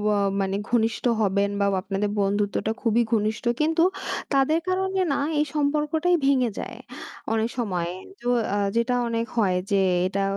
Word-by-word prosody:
অ - - +1 0.2
মানে 195 0 -1
ঘনিষ্ঠ 230 -1 +1 0.2
হবেন 200 0 +2
বা 200 - +2 0.2
আপনাদের 195 +2 -2
বন্ধুত্বটা 205 +2 0
খুবই 230 0 +2
ঘনিষ্ঠ 215 +2 0 0.2
কিন্তু 325 +2 +3 0.5
তাদের 275 +4 +3
কারণে 380 +1 0
না - - 0 0.2
এই 300 - +3
সম্পর্কটাই 300 +4 +1
ভেঙে 260 -4 +3
যায় - - -6 0.6
অনেক 225 +1 +1
সময়। 180 -7 -1 0.3
তো 245 - -5 0.3
আ - - +1 0.2
যেটা 235 +2 +1
অনেক 230 0 -1
হয় 190 -5 +3 0.2
যে 200 - +4 0.3
এটা 195 +1 -1
230 Hz, 150 wpm, -24 LUFS, 200-285 Hz, 0.6 s, যে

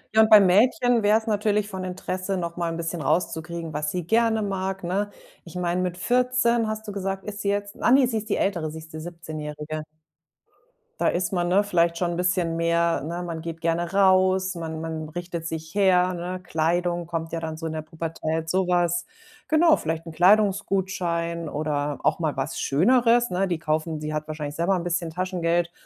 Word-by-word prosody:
Ja, 220 - +8
und 220 - +4
bei 215 -1 +10
Mädchen 225 +4 +4
wär's 220 +2 +3
natürlich 210 -1 +1
von 190 -2 -6
Interesse, 185 +1 -3
noch 170 -1 -4
mal 170 -1 -1
'n 165 - -4
bisschen 165 0 -3
rauszukriegen, 165 -1 -2
was 150 0 -2
sie 180 -2 -3
gerne 225 -1 +3
mag, 195 -1 -3
ne? 200 +4 -1 0.3
Ich 170 0 -13
meine, 180 0 0
mit 180 -1 -2
14 245 0 +2
hast 215 0 -4
du - - -4
gesagt, 195 -1 -3
ist 205 -1 -6
sie 200 - -1
jetzt. 205 0 -2
Ah, 240 - +3
ne, 265 -1 +6
sie 225 -2 -1
ist 215 +1 -5
die - - +1
Ältere, 170 -6 -1
sie 160 - -7
ist 160 0 -14
die 155 - -6
17- 165 -2 -7
Jährige. 150 +1 -5 1.2
Da - - +3
ist 180 +2 -1
man, 175 -2 0
ne, 200 +3 +4
vielleicht 170 -4 +1
schon 175 -1 0
'n - - -4
bisschen 180 -2 +1
mehr, 170 0 +1
ne 170 +3 -4
man 165 -2 -5
geht 165 0 -6
gerne 170 +1 0
raus, 190 -1 +3
man 160 -1 -5
man 160 -1 -5
richtet 170 0 -5
sich 160 +2 -6
her, 185 -2 +3
ne? 180 +1 -4
Kleidung 175 +1 0
kommt 165 -1 -4
ja 165 - -2
dann 160 -1 -4
so 165 0 -5
in 160 - -4
der 155 -1 -4
Pubertät, 160 0 -4
so 185 0 +1
was. 175 -1 +1 0.4
Genau, 315 +1 +5
vielleicht 160 +1 -3
'n - - -6
Kleidungsgutschein 180 -3 +1
oder 145 -1 -2
auch 155 - +2
mal 160 -3 -1
was 135 +3 -3
Schöneres, 235 - +3
ne? 185 +2 0
Die 175 -3 -2
kaufen 155 0 -2
sie 150 0 -3
hat 155 0 -3
wahrscheinlich 150 -1 -5
selber 170 +4 +1
'n 175 - -2
bisschen 170 -1 -2
Taschengeld, 175 -1 0
175 Hz, 205 wpm, -25 LUFS, 165-195 Hz, 1.2 s, bei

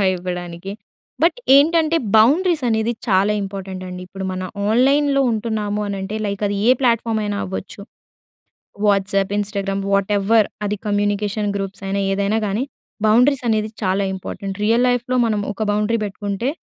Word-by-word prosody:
సలహా 200 - +2
ఇవ్వడానికి. 180 +1 -6 0.5
బట్, 350 +9 +3 0.2
ఏంటంటే 325 +2 +4 0.2
బౌండరీస్ 305 +7 +4
అనేది 220 +1 +1 0.2
చాలా 195 +2 +3
ఇంపార్టెంట్ 190 -1 -6
అండి. 180 0 -7
ఇప్పుడు 190 +1 -7
మన 185 0 -4 0.3
ఆన్‍లైన్‍లో 275 +4 +3
ఉంటున్నాము 215 -2 -2
అనంటే 200 +1 -4
లైక్ 200 0 -4
అది 200 0 -1
ఏ - - +8
ప్లాట్‍ఫామ్ 230 -3 +1
అయినా 205 -1 -2
అవ్వచ్చు. 190 +2 -6 1.1
వాట్సాప్, 195 -1 +1
ఇన్స్టాగ్రామ్, 200 -1 -2
వాట్‌ఎవర్ 200 +2 +3 0.2
అది 205 +1 -1
కమ్యూనికేషన్ 205 0 0
గ్రూప్స్ 195 0 -5
అయినా 200 +1 -1
ఏదైనా 200 +2 0
కానీ, 205 +6 -1 0.4
బౌండరీస్ 250 +4 +4
అనేది 215 0 +1
చాలా 190 +1 +1
ఇంపార్టెంట్. 195 +1 -6
రియల్ 230 +3 +3
లైఫ్‌లో 245 +1 0
మనం 215 -2 0
ఒక 220 - -3
బౌండరీ 210 +2 +1
పెట్టుకుంటే 205 +4 -3
205 Hz, 140 wpm, -20 LUFS, 195-230 Hz, 1.1 s, ఏ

